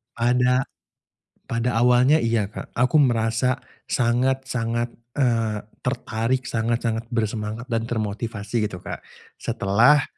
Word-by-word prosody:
Pada 125 +2 +2 0.8
pada 115 0 0
awalnya, 125 +5 +5
iya 115 -5 +1
Kak. - - -9
Aku 125 +6 +3
merasa 120 0 +2 0.3
sangat-sangat, 120 -1 0 0.2
eee, 115 -6 +1 0.2
tertarik, 125 0 -1
sangat-sangat 115 0 -1
bersemangat 110 +1 -2
dan 115 0 0
termotivasi 110 -1 -2
gitu, 90 -3 -7
Kak. - - -5 0.4
Setelah 120 +9 +4
115 Hz, 100 wpm, -23 LUFS, 110-125 Hz, 0.8 s, awalnya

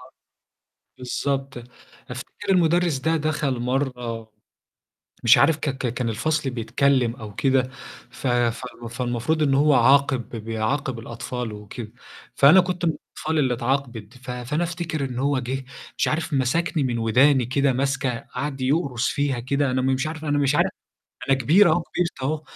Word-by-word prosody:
آه. - - -15 0.9
بالضبط، 135 +1 -3 0.5
أفتكر - - -6
المدرس 175 -4 +3
ده 160 +5 +1
دخل 150 -4 -1
مرّة 125 -3 -3 0.9
مش 120 +3 +7
عارف 155 +5 +4
ك 155 - -2
ك 130 -3 -3
كان 120 -1 -2
الفصل 140 +5 -1
بيتكلّم 125 +1 +1
أو 110 -4 -10
كده 130 -2 +2 0.4
ف 135 - -5
فو 120 0 -1
فالمفروض 125 +6 -1
إن 140 -2 +2
هو 145 +2 +4
عاقب 135 0 +3
ب - - -8
بيعاقب 115 +4 -2
الأطفال 120 0 -5
وكده، 105 +2 -8 0.4
فأنا 175 +7 +7
كنت 180 -1 -3
من 165 - +3
الأطفال 160 0 -4
اللي 130 -3 +2
اتعاقبت، 120 -2 -3
ف 125 0 -8
فأنا 125 +7 -2
أفتكر 165 -4 -3
إن 125 -1 -5
هو 140 0 +1
جِه 130 +2 -4 0.3
مش - - +1
عارف 155 0 -1
مسكني 145 +4 +1
من 120 -2 -1
وداني 125 +4 +4
كده 135 +2 +1
ماسكة 135 +1 0
قعد 135 +2 -5
يقرُص 135 -3 0
فيها 140 -3 -1
كده 140 +2 0
أنا 130 0 0
م - - -1
مش 130 +3 +1
عارف 160 0 -6
أنا 145 -1 +1
مش 145 0 +2
عارف - - +2 0.6
أنا 135 - +4
كبير 170 - +5
أهو، 175 - +2
كبرت 170 -4 -3
أهو 150 +3 -1
135 Hz, 160 wpm, -23 LUFS, 120-150 Hz, 0.9 s, مش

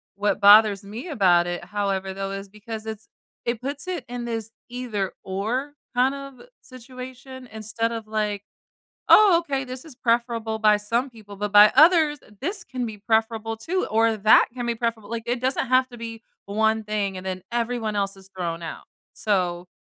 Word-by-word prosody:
What 205 +1 0
bothers 205 -1 +7
me 220 - -8
about 180 - +3
it, 175 0 -4
however, 195 -2 -2
though, 195 0 -4
is 195 0 -6
because 215 +1 -8
it's 220 0 -7 0.4
it 235 -1 -1
puts 280 +5 -5
it 360 -2 -4
in 245 -1 -5
this 225 -2 -4 0.2
either-or 230 +2 -3 0.2
kind 260 +2 +3
of 275 -2 -9 0.2
situation 255 +1 -10
instead 220 +1 -2
of 225 -2 -5
like, 210 -2 -2 0.7
"Oh, 405 -5 +8
okay, 275 -5 -2
this 255 +3 -8
is 295 -6 -11
preferable 230 -2 0
by 215 -1 +5
some 235 +6 -1
people, 210 -4 -13
but 205 0 -3
by 205 +1 +9
others, 310 0 +6 0.2
this 375 +6 -2
can 255 -2 -4
be 220 -2 -6
preferable 225 +1 0
too 355 +12 -2
or 225 0 +3
that 215 +2 +6
can 245 -1 -4
be 235 - 0
preferable." 225 -2 -3
Like, 230 -1 -4
it 240 0 0
doesn't 260 0 0
have 255 0 +3
to 240 - -11
be 230 0 -7 0.2
one 220 +2 +1
thing 205 -2 -2
and 185 - -8
then 185 -1 -4
everyone 235 -2 -1
else 195 -1 -1
is 190 0 -16
thrown 170 -2 -3
out. 165 - -7 0.3
So, 180 -4 -1
225 Hz, 180 wpm, -24 LUFS, 205-250 Hz, 0.7 s, by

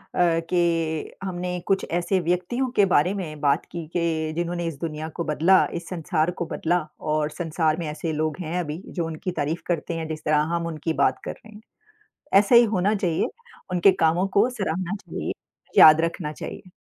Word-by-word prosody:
अ, 170 -2 +3
कि 165 -3 0
हमने 180 -1 -3
कुछ 195 -1 +1
ऐसे 175 +3 +1
व्यक्तियों 180 +10 -1
के 200 - +5
बारे 180 0 +3
में 165 -7 -5
बात 140 -2 +2
की 170 -2 -5
कि 160 -2 0
जिन्होंने 175 0 -2
इस 165 -4 -5
दुनिया 155 -1 -4
को 170 - -1
बदला 165 +5 +4
इस 170 0 -5
संसार 170 -1 0
को 170 -1 -4
बदला। 170 +2 0 0.2
और 150 0 0
संसार 160 -1 0
में 165 - -3
ऐसे 160 +2 -3
लोग 155 +1 -1
हैं 175 +1 -2
अभी 155 0 -4
जो 170 -3 -3
उनकी 165 +3 -4
तारीफ़ 155 +4 -1
करते 170 -1 -1
हैं 160 - -4
जिस 155 -1 -6
तरह 150 0 +3
हम 170 0 -2
उनकी 160 0 -3
बात 130 - +2
कर - - -3
रहे 220 - -17
हैं। 210 - -12 0.8
ऐसा 205 +4 +2
ही 235 0 +9
होना 195 +4 +2
चाहिए 175 -5 0 0.4
उनके 180 +2 +5
कामों 170 +4 +3
को 225 +5 +5
सराहना 190 -4 -2
चाहिए - - -4 0.5
याद 155 0 +9
रखना 165 -2 -2
चाहिए। 185 - -8
170 Hz, 190 wpm, -24 LUFS, 155-180 Hz, 0.8 s, ही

